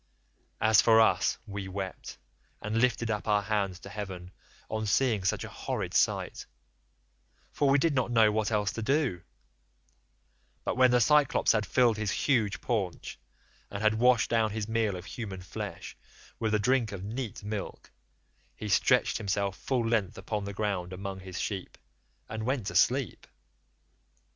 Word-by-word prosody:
As 110 0 +5
for 115 -1 +5
us, 100 -4 +3
we 100 -2 -6
wept 95 0 -6 0.4
and 110 +2 -1
lifted 120 -2 +1
up 105 0 -3
our 105 -1 +2
hands 100 -3 -1
to 100 - -10
heaven 95 -3 -7 0.4
on 110 0 -3
seeing 110 -3 +2
such 95 - 0
a - - -6
horrid - - -4
sight, - - 0 1.0
for 145 - +1
we 135 - +5
did 160 +2 +2
not 130 -3 0
know 110 -3 +4
what 110 0 0
else 105 -2 +1
to 115 - -5
do; 135 - 0 1.4
but - - -2
when 130 0 +5
the 125 0 +4
Cyclops 150 +2 +4
had 105 -2 0
filled 120 +1 +3
his 110 -1 -2
huge 110 -4 +1
paunch, 100 -8 -3 0.5
and 100 +1 -5
had 110 0 +4
washed 125 -2 +4
down 115 -2 +3
his 105 0 -4
meal 110 -3 0
of 90 0 -8
human 100 -6 -7
flesh - - -7 0.4
with 110 -1 +1
a - - +4
drink 125 0 +1
of 95 -2 -6
neat 110 0 -5
milk, 105 0 -6 0.6
he 105 - -6
stretched 95 - +3
himself 100 -2 -1
full 125 0 -1
length 110 -5 0
upon 105 -2 -4
the 100 - -5
ground 95 -3 -2
among 95 +1 -6
his 95 -1 -7
sheep, 95 -3 -4 0.5
and 110 0 -5
went 125 -2 -1
to 100 - -4
sleep. 130 -5 +1
110 Hz, 165 wpm, -29 LUFS, 100-115 Hz, 1.4 s, As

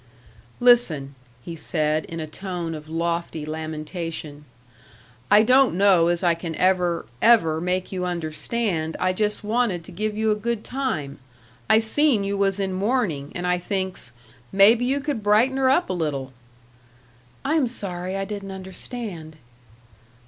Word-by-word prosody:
"Listen," 205 - +3 0.3
he 170 - -7
said, 155 0 -1
in 165 - -7
a 160 - -3
tone 175 +1 -5
of 155 0 -9
lofty 170 -1 -2
lamentation, 155 -1 -5 0.8
"I 210 +1 +7
don't 255 -1 +4
know 185 -3 +5
as 175 0 0
I 175 -1 +4
can 165 -1 -5
ever, 180 -2 +1 0.2
ever 165 -9 +4
make 180 +1 -1
you 185 -1 -3
understand 170 +1 -2
I 185 0 +1
just 210 +2 -1
wanted 215 -5 0
to - - -11
give 210 +4 -3
you 220 0 +2
a - - +2
good 225 +1 -3
time. 155 - -3 0.5
I - - +7
seen 225 +1 +2
you 200 0 -1
was 195 0 +1
in 190 -1 -1
mourning, 190 - -1
and 175 - -3
I 180 0 +1
thinks, 190 - -4 0.4
'Maybe 220 +5 +5
you 275 +3 0
could 285 -5 -3
brighten 220 +6 +3
her 265 -1 +3
up 345 +7 +3
a - - -2
little 140 -6 -3 0.5
'" 120 0 -31
"I 290 - +1
am 305 -6 +3
sorry 185 -5 -4
I 195 - -2
didn't 200 -1 -6
understand." 190 -3 -6
185 Hz, 155 wpm, -23 LUFS, 160-215 Hz, 0.8 s, I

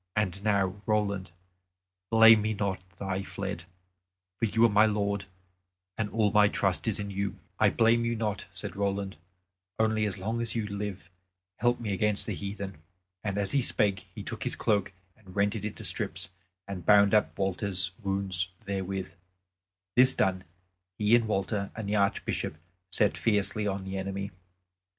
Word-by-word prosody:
And 100 -2 0
now, 100 -2 +1
Roland, 100 -4 0 0.8
blame 115 -1 +8
me 110 0 -1
not 95 -2 -1 0.2
that - - -6
I 95 0 -1
fled; 85 -3 -5 0.7
for - - +2
you 115 +2 +4
are - - +5
my 105 +1 +5
lord, 100 -1 -1 0.7
and 110 -2 -2
all 105 -2 +2
my 105 0 +6
trust 95 0 0
is 105 -2 0
in 100 0 -4
you." 100 0 -2 0.2
"I - - +6
blame 115 +1 +3
you 115 0 0
not," 105 -3 -2
said - - -6
Roland, 100 -2 -2 0.6
"only 110 -1 +2
as 100 - -4
long 110 +5 -2
as 115 0 -2
you 115 -2 0
live 100 -4 -5 0.5
help 120 +1 +2
me 110 -4 -2
against 105 +1 +1
the - - -2
heathen." 100 -4 -6 0.4
And 100 -2 -2
as 100 -1 0
he 140 - +3
spake 100 -5 +1
he - - -6
took - - -6
his - - -1
cloak 100 -3 +1 0.2
and 95 -5 -16
rent 100 +2 +2
it 105 -2 -4
into 105 - -5
strips 85 - -2 0.4
and 95 -3 -5
bound 100 0 +6
up 105 - +3
Walter's 95 -1 0
wounds 95 -3 +1 0.2
therewith. 95 -1 -3 0.8
This 130 +1 +6
done 95 -1 +1 0.5
he 105 +2 +4
and 115 -2 +2
Walter 100 0 -1
and 110 -2 -5
the 105 +1 +1
Archbishop 100 -5 0 0.3
set 105 +1 +3
fiercely 105 -1 +1
on 100 -1 -2
the 95 0 -4
enemy. 100 +1 -4
100 Hz, 170 wpm, -29 LUFS, 95-110 Hz, 0.8 s, blame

